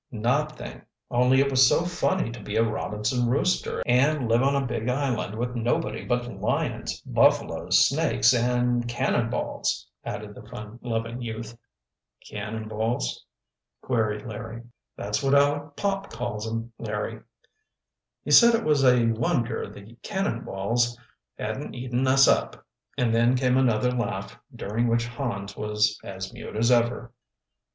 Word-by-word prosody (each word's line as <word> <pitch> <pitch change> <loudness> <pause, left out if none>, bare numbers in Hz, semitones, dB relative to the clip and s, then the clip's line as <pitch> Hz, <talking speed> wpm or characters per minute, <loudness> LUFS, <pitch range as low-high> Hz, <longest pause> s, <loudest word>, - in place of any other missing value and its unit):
"Nothing, 135 +7 -2 0.3
only 125 +2 +4
it 140 0 +1
was 130 -1 +6
so 170 - +2
funny 180 -5 0
to 120 - -8
be 105 +1 -5
a 115 - +4
Robinson 110 +2 -1
Rooster 165 +9 0
and 130 +2 +3
live 115 +1 +3
on 140 +1 +2
a 140 -1 +1
big 120 -1 -2
island 125 -6 -1
with 120 +1 -2
nobody 115 -2 -1
but 120 -1 0
lions, 120 - -2
buffaloes, - - +3
snakes, 120 - +3
and 120 0 +1
'cannonballs,'" 120 0 -1 0.2
added - - -6
the - - -11
fun 105 +2 -10
loving 115 0 -3
youth. 115 0 -6 0.7
"Cannonballs?" 110 - -3 0.6
queried 110 -4 -1
Larry 115 +1 -7 0.3
"That's 105 +4 -2
what 135 0 +3
Aleck 145 +1 +2
Pop 200 -1 -2
calls 115 -2 -4
'em, 115 +1 -4
Larry. 110 0 -4 1.0
He - - -4
said 235 -1 +8
it 230 - -1
was 150 -3 +2
a 125 -2 +5
wonder 115 0 0
the 100 +3 -13
'cannonballs' 120 - -1 0.4
hadn't - - -4
eaten 125 +1 -1
us 135 +1 +6
up," - - +1 0.3
and 120 -3 +1
then 120 +2 +4
came 125 0 +2
another 125 -2 +2
laugh, 115 -6 -3 0.2
during 110 +4 -1
which 115 0 +1
Hans 115 -5 -4
was 105 0 0
as 95 -1 -7
mute - - -8
as 115 +3 +2
ever. 120 0 +1
120 Hz, 140 wpm, -26 LUFS, 110-130 Hz, 1.0 s, said